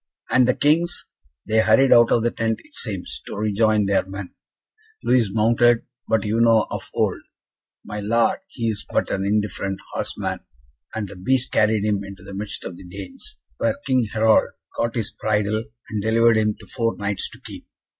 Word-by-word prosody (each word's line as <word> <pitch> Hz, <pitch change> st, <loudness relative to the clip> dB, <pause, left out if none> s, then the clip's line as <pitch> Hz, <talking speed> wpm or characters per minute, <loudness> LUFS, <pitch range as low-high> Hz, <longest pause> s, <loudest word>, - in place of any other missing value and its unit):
"And 130 Hz, -1 st, +5 dB
the 125 Hz, -, +3 dB
Kings?" 165 Hz, +4 st, +1 dB, 0.4 s
"They 110 Hz, +1 st, +2 dB
hurried 110 Hz, +5 st, +5 dB
out 120 Hz, -1 st, +6 dB
of 115 Hz, -, +3 dB
the 120 Hz, -, +1 dB
tent, 115 Hz, 0 st, -1 dB
it 305 Hz, -, -23 dB
seems, 100 Hz, -6 st, -3 dB
to -, -, -5 dB
rejoin 105 Hz, 0 st, +2 dB
their 100 Hz, 0 st, +2 dB
men. 95 Hz, 0 st, -8 dB, 0.7 s
Louis 120 Hz, -5 st, +3 dB
mounted, 115 Hz, +2 st, +3 dB, 0.2 s
but 110 Hz, -2 st, +1 dB
you 110 Hz, +2 st, +1 dB
know 115 Hz, -2 st, +5 dB
of -, -, -5 dB
old, -, -, 0 dB, 0.6 s
my 105 Hz, -, -5 dB
Lord, 115 Hz, +3 st, +2 dB
he 115 Hz, -9 st, -3 dB
is 105 Hz, -2 st, -3 dB
but -, -, 0 dB
an 95 Hz, -, -1 dB
indifferent 100 Hz, -2 st, -1 dB
horseman, -, -, -3 dB, 0.6 s
and 110 Hz, -2 st, -2 dB
the -, -, -10 dB
beast 130 Hz, +8 st, 0 dB
carried 105 Hz, -1 st, +2 dB
him 100 Hz, -2 st, 0 dB
into 100 Hz, -2 st, -10 dB
the 100 Hz, +1 st, -10 dB
midst 100 Hz, +1 st, -5 dB
of 85 Hz, -, -6 dB
the -, -, -12 dB
Danes, 95 Hz, +1 st, -9 dB, 0.2 s
where 115 Hz, -1 st, +1 dB
King 130 Hz, -4 st, +2 dB
Harald 110 Hz, 0 st, +3 dB, 0.2 s
caught 115 Hz, +1 st, -1 dB
his 115 Hz, -4 st, -2 dB
bridle, 110 Hz, +1 st, -1 dB, 0.3 s
and 105 Hz, -1 st, -2 dB
delivered 115 Hz, +2 st, +4 dB
him 105 Hz, -1 st, +1 dB
to -, -, -13 dB
four 115 Hz, -2 st, -2 dB
Knights 100 Hz, -1 st, -2 dB
to -, -, -14 dB
keep. -, -, -10 dB
110 Hz, 185 wpm, -22 LUFS, 100-115 Hz, 0.7 s, out